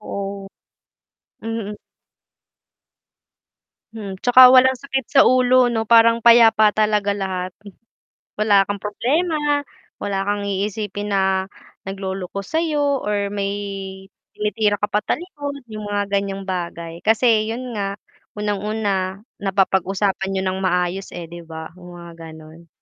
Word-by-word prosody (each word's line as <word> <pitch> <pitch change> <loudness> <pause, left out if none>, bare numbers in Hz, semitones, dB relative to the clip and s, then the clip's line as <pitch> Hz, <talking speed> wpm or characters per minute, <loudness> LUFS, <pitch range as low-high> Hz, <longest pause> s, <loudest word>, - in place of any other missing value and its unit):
Oo. 200 -1 -6 1.0
Mm. 225 -2 -4 2.2
Hmm, 200 -4 -7
'tsaka 250 +5 +8
walang 260 0 +6
sakit 265 0 -3
sa 270 - +6
ulo 255 0 +4
'no 225 -2 -1
parang 230 0 +5
payapa 225 -3 +6
talaga 210 -1 +1
lahat. 185 -2 -4 0.8
Wala 205 -2 +3
kang 205 -1 -5
problema, 295 +6 0 0.3
wala 195 -1 -3
kang 205 0 -1
iisipin 205 +1 -3
na 190 -1 +1 0.4
nagloloko 195 0 -5
sayo 295 - 0
or 205 -2 -2
may 200 -1 -2 0.8
tinitira 210 0 0
ka 205 +1 -3
patalikod 285 - -3
yung 215 -1 -6
mga 205 0 -1
ganyang 195 -1 -1
bagay. 170 -3 -5
Kasi 220 +1 +2
yun 245 +3 -5
nga, 195 0 -2 0.4
unang-una, 205 -2 -2 0.2
napapag-usapan 195 0 0
niyo 190 - 0
ng 190 0 -2
maayos 180 0 -1
eh, 170 -1 -8
di 175 - -8
ba, 160 -1 -9
yung 175 0 -12
mga 170 0 -11 0.2
ganun. 160 +2 -15
205 Hz, 120 wpm, -21 LUFS, 190-225 Hz, 2.2 s, tsaka